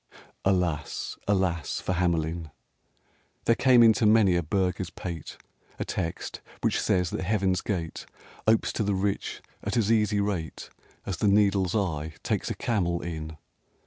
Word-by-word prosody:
XIV -, -, -24 dB, 0.3 s
Alas, 90 Hz, -6 st, 0 dB
alas 95 Hz, -6 st, 0 dB
for 95 Hz, -, -2 dB
Hamelin! 85 Hz, -2 st, 0 dB, 1.0 s
There 115 Hz, -, +5 dB
came 125 Hz, 0 st, +6 dB
into 110 Hz, -1 st, +5 dB
many 105 Hz, -4 st, +5 dB
a 85 Hz, -, +2 dB
burgher's 90 Hz, +1 st, -1 dB
pate 85 Hz, -2 st, -7 dB, 0.4 s
A -, -, -3 dB
text 85 Hz, -3 st, -4 dB, 0.2 s
which -, -, +1 dB
says 90 Hz, -2 st, +1 dB
that -, -, -3 dB
heaven's 95 Hz, -2 st, +1 dB
gate 85 Hz, -6 st, -4 dB, 0.4 s
Opes 110 Hz, 0 st, +3 dB
to 110 Hz, -, 0 dB
the 100 Hz, -1 st, +1 dB
rich 100 Hz, +1 st, -2 dB, 0.2 s
at -, -, -1 dB
as 110 Hz, -1 st, +2 dB
easy 105 Hz, -2 st, +3 dB
rate 95 Hz, -6 st, -3 dB, 0.3 s
As 95 Hz, -3 st, -3 dB
the 105 Hz, -, +1 dB
needle's 100 Hz, -2 st, +3 dB
eye 80 Hz, -6 st, -1 dB
takes -, -, -1 dB
a -, -, -2 dB
camel 90 Hz, -7 st, 0 dB
in! 80 Hz, -2 st, -5 dB
95 Hz, 150 wpm, -27 LUFS, 85-105 Hz, 1.0 s, came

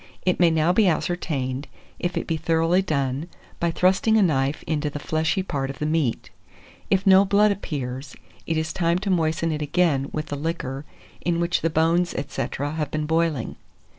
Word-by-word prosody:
It 180 Hz, -, +1 dB
may 175 Hz, -2 st, +6 dB
now 160 Hz, +2 st, +2 dB
be 210 Hz, +1 st, +4 dB
ascertained 145 Hz, -6 st, -1 dB, 0.3 s
if 175 Hz, 0 st, -2 dB
it -, -, -2 dB
be 165 Hz, -, -1 dB
thoroughly 165 Hz, +3 st, +2 dB
done 140 Hz, -3 st, -1 dB, 0.3 s
by 170 Hz, -, +1 dB
thrusting 190 Hz, +6 st, +3 dB
a 215 Hz, -, +5 dB
knife 140 Hz, -4 st, +1 dB
into 150 Hz, -1 st, -1 dB
the 145 Hz, -, -6 dB
fleshy 160 Hz, +5 st, 0 dB
part 140 Hz, -7 st, -3 dB
of 135 Hz, -, -6 dB
the 150 Hz, -, -2 dB
meat. 155 Hz, -6 st, -1 dB, 0.6 s
If 195 Hz, 0 st, +2 dB
no 190 Hz, 0 st, +7 dB
blood 205 Hz, +1 st, +4 dB
appears, 135 Hz, -8 st, -5 dB, 0.3 s
it 165 Hz, -, 0 dB
is 160 Hz, 0 st, -2 dB
time 170 Hz, -1 st, +1 dB
to 195 Hz, +1 st, -2 dB
moisten 165 Hz, -1 st, +1 dB
it 155 Hz, -1 st, -3 dB
again 150 Hz, -3 st, +1 dB
with 155 Hz, -1 st, -3 dB
the 145 Hz, -, -2 dB
liquor 145 Hz, -2 st, -4 dB, 0.4 s
in 170 Hz, 0 st, 0 dB
which 170 Hz, 0 st, +1 dB
the 165 Hz, -, +1 dB
bones, 165 Hz, +2 st, +2 dB
&c. 135 Hz, -, -3 dB
have 145 Hz, +1 st, -2 dB
been 155 Hz, 0 st, -2 dB
boiling. 160 Hz, -5 st, 0 dB
160 Hz, 185 wpm, -24 LUFS, 145-175 Hz, 0.6 s, no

